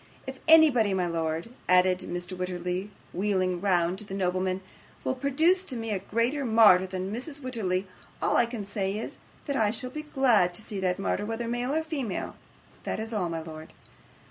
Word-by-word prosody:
'If 265 -1 -7
anybody, 280 -11 +6
my 180 -1 +1
lord,' 165 +1 -2 0.2
added 180 0 +5
Mr. 180 0 -5
Wititterly, 180 +1 -3 0.2
wheeling 185 -2 0
round 180 -2 +2
to - - -7
the 195 -2 -7
nobleman, 185 0 0 0.4
'will - - 0
produce 310 +8 +2
to 260 - -2
me 225 -1 -3
a 200 - 0
greater 230 +8 0
martyr 220 -6 +6
than 185 +1 -4
Mrs 280 +5 -5
Wititterly, 210 -8 -2 0.3
all - - +1
I 240 - +4
can 230 -4 -5
say 195 0 -2
is, 220 - -6 0.3
that 280 - -2
I 220 -5 +3
shall 250 +3 -4
be 305 - -5
glad 250 -12 +3
to 215 - -7
see 205 -2 -5
that 185 -1 0
martyr, 205 +1 -1
whether 225 +1 -3
male 245 +4 -1
or 320 - +1
female 280 - -3 0.5
that's 225 +1 -3
all, 185 -5 0
my 165 -1 -3
lord. 160 -1 -10
205 Hz, 185 wpm, -28 LUFS, 185-250 Hz, 0.5 s, anybody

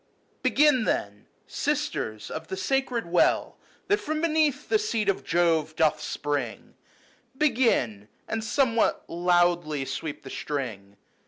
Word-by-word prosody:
X"" - - -41 0.2
Y/ - - -39
Begin, 290 -6 +4
then, 105 0 -2 0.2
Sisters 110 -1 -2
of 160 +1 -6
the 190 - -5
sacred 250 +2 0
well 170 +1 +2 0.3
That 410 - +3
from 310 +1 -2
beneath 310 -3 +1
the 430 - +3
seat 230 - -1
of 195 - 0
Jove 165 -2 +1
doth 160 -2 +2
spring; 145 -6 -3 0.6
Begin, 230 - +1 0.2
and 225 0 -2
somewhat 230 0 +1
loudly 175 -4 +1
sweep 145 +3 -5
the 135 - -9
string. 105 -9 -5
175 Hz, 135 wpm, -26 LUFS, -, 0.6 s, Begin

